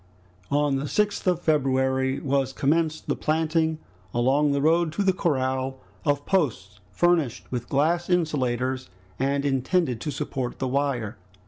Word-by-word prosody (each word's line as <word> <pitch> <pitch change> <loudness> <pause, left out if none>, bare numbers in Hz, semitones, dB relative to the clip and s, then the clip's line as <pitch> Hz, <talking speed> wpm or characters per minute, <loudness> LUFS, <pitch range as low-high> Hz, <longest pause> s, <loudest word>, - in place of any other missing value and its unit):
On 145 -1 +2
the 135 - -3
6th 205 +6 0
of 175 -1 +1
February 130 -3 +1
was 135 -1 0
commenced 155 +3 0
the - - 0
planting 160 0 +1 0.4
along 135 +5 +3
the 140 - +1
road 165 +2 +3
to 200 - 0
the 190 -1 +3
corral, 130 -5 -1 0.3
of 145 -1 +1
posts 115 - -1
furnished 165 -9 +1
with 120 -1 -4
glass 165 +5 +1
insulators, 130 -7 0 0.3
and 140 +2 0
intended 135 - +1
to - - -3
support 135 -3 -3
the 130 - -2
wire. 130 -6 -1
140 Hz, 140 wpm, -25 LUFS, 130-160 Hz, 0.4 s, along